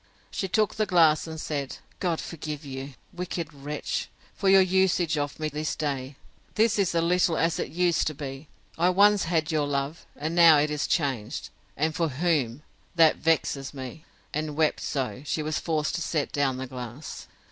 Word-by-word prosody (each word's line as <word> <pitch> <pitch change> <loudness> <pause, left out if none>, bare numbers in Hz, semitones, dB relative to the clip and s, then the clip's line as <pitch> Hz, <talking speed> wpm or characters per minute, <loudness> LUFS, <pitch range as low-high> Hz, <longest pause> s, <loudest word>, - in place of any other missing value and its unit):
She 190 - -2
took 215 +3 +1
the 215 -1 0
glass, 165 -4 +4
and 160 0 -6
said, 140 -3 -3 0.2
God 175 -4 0
forgive 155 -2 -6
you, 135 0 -7 0.2
wicked 175 -3 -4
wretch, 145 +1 -4 0.2
for 195 - 0
your 195 0 +8
usage 185 -3 +2
of 145 0 -3
me 155 - -1
this 150 +1 -3
day!—This 150 - -2
is 185 -3 +1
a 165 - +3
little 175 -1 +2
as 165 0 +1
it - - -2
used 175 +2 +1
to 155 - -2
be!—I 145 +5 -3
once 200 +1 +5
had 165 -1 0
your 150 -2 +1
love;—and 145 +2 -3
now 170 -3 +8
it 150 +1 +2
is 150 -1 -1
changed; 130 -9 -1 0.3
and 155 +2 +1
for 165 0 +1
whom? 145 -3 0 0.3
that 165 -2 +5
vexes 145 -4 0
me! 130 +3 -7 0.3
And 155 0 -2
wept 155 -1 +2
so, 130 -2 -3
she 150 +1 -2
was 155 0 -1
forced 155 -2 -1
to - - -2
set 155 -3 -1
down 135 -3 0
the 130 - -4
glass. 125 +2 -8
155 Hz, 175 wpm, -27 LUFS, 140-170 Hz, 0.3 s, your